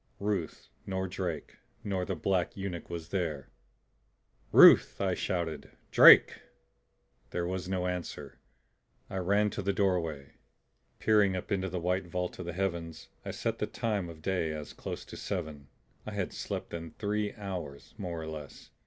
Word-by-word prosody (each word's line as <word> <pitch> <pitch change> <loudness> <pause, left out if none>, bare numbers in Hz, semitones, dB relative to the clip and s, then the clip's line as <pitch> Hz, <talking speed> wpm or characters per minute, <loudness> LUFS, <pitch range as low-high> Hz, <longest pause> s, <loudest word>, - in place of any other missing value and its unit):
Ruth 95 -11 -2 0.2
nor 95 -1 -2
Drake 90 -4 -4 0.3
nor 95 -3 -1
the 95 - -2
black 90 +3 0
eunuch 95 -4 -5
was 85 -1 -6
there! 80 -9 -2 1.0
"Ruth!" - - +8
I 95 -2 +1
shouted. 85 -5 -2 0.2
"Drake!" - - +8 0.9
There 85 - -2
was 90 0 -3
no 90 -1 -1
answer. 90 -1 -5 0.7
I 95 - -3
ran 100 +3 +2
to - - -4
the 100 +1 +1
doorway. 85 -8 0 0.7
Peering 105 -3 +3
up 90 - -5
into 95 -1 0
the 90 +1 -3
white 90 +1 -1
vault 90 +1 -3
of 90 - -5
the 85 - -3
heavens 85 -4 -3
I - - -6
set - - -2
the - - -1
time 105 -6 -2
of 80 -1 -11
day 90 -4 0
as 75 -1 -7
close - - -6
to - - -10
seven; 80 -7 -5 0.4
I - - -5
had - - -2
slept - - -5
then 80 -1 -7
three 105 0 -1
hours, 90 -9 -6
more 90 -4 -4
or - - -6
less. 75 -3 -9
90 Hz, 160 wpm, -30 LUFS, 80-95 Hz, 1.0 s, Ruth